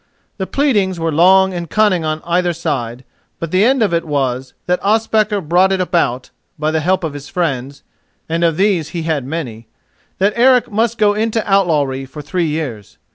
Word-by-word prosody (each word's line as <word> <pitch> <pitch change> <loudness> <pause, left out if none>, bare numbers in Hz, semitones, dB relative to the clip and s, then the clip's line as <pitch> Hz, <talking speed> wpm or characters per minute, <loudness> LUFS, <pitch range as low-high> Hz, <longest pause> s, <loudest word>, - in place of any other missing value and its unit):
The 190 -3 -3
pleadings 205 -11 +1
were 165 0 -1
long 190 +4 +4
and 170 -2 -5
cunning 205 -6 +2
on 155 0 -3
either 175 +1 +1
side; 130 -7 -4 0.3
but 165 -1 -5
the 185 +2 +3
end 260 +1 +3
of 200 -5 0
it 170 - +1
was 130 -4 -2
that 180 0 0
Ospakar 215 -1 +1
brought 180 +4 +2
it 190 - 0
about, 165 -9 -1 0.3
by 155 +1 -1
the 160 - 0
help 185 +4 0
of 160 -3 -3
his 145 0 -9
friends—and 145 +2 -4
of 165 -2 +2
these 190 -6 +1
he 165 - -3
had 155 -5 -1
many—that 155 - -5
Eric 250 0 +4
must 225 +2 0
go 210 -2 +3
into 220 +1 -1
outlawry 150 -9 +1
for 140 +3 -10
three 175 +2 -1
years. 145 -9 -5
170 Hz, 180 wpm, -17 LUFS, 150-195 Hz, 0.3 s, long